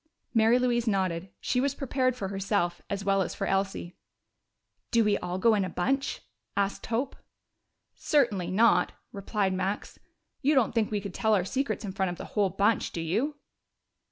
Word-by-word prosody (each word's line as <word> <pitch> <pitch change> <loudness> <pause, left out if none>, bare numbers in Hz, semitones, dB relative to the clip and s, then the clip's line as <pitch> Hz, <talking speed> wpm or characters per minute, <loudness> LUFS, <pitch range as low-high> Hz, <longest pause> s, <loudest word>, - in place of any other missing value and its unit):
Mary 225 +1 +5
Louise 240 -2 +1
nodded; 190 -3 0
she 250 - 0
was 280 0 0
prepared 255 -2 0
for 195 -6 -4
herself 195 -2 -1
as 200 -1 -3
well 195 -1 +3
as 180 - -2
for - - -2
Elsie. 195 -2 -1 0.9
"Do 230 -1 +4
we 210 -1 +3
all 180 +1 -3
go 225 +4 +4
in 205 -2 +2
in 185 - -2
a - - -11
bunch?" 270 +12 -1 0.4
asked 200 0 -1
Hope. 245 +4 -1 0.8
"Certainly 225 - +1
not!" 220 +5 +4 0.2
replied 200 -1 -1
Max. 190 +2 -3 0.4
"You 290 +2 +3
don't 255 -5 +3
think 225 -2 +1
we 210 -1 -1
could 195 -2 -6
tell 220 +2 +2
our 185 -3 +1
secrets 225 -2 -2
in 195 - -4
front 190 -1 -1
of 175 - -5
the - - -7
whole 205 -3 +2
bunch, 200 +4 +1
do - - -5
you?" 215 - -1
205 Hz, 185 wpm, -28 LUFS, 190-235 Hz, 0.9 s, Mary